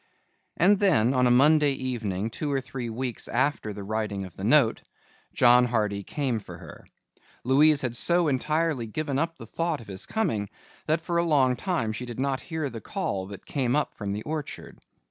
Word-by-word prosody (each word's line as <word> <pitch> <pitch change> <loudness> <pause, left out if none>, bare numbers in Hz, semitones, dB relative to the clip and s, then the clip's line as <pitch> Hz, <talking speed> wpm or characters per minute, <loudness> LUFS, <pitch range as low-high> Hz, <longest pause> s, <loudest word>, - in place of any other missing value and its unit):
And 195 +4 +4
then 135 - +3
on 125 -1 +3
a - - +3
Monday 145 +3 +5
evening 115 -6 -3
two 145 +5 -3
or 135 - +1
three 125 -2 -6
weeks 120 +1 -4
after 130 -2 0
the 100 0 -7
writing 105 -1 -3
of 90 - -12
the 95 - -8
note, 120 +1 +4 0.5
John 125 0 +5
Hardy 105 -4 -1
came 125 +2 -2
for 100 - -11
her. - - -13 0.6
Louise 145 +3 +4
had 120 -2 -2
so 170 +6 +3
entirely 150 -2 0
given 140 +4 -2
up 165 +1 -2
the - - -9
thought 165 -2 -2
of 115 - -12
his 95 -2 -5
coming 110 - -1 0.4
that 155 +1 +1
for 170 +1 -2
a - - +2
long 140 -6 +3
time 140 - -2
she 125 +3 -6
did 120 0 -7
not 135 -1 0
hear 160 -3 -3
the 115 -4 -7
call 95 -1 -3
that 100 -1 -10
came 130 -3 0
up 150 - 0
from 100 -2 -5
the 105 +2 -4
orchard. 155 -1 -6
130 Hz, 195 wpm, -26 LUFS, 110-150 Hz, 0.6 s, Monday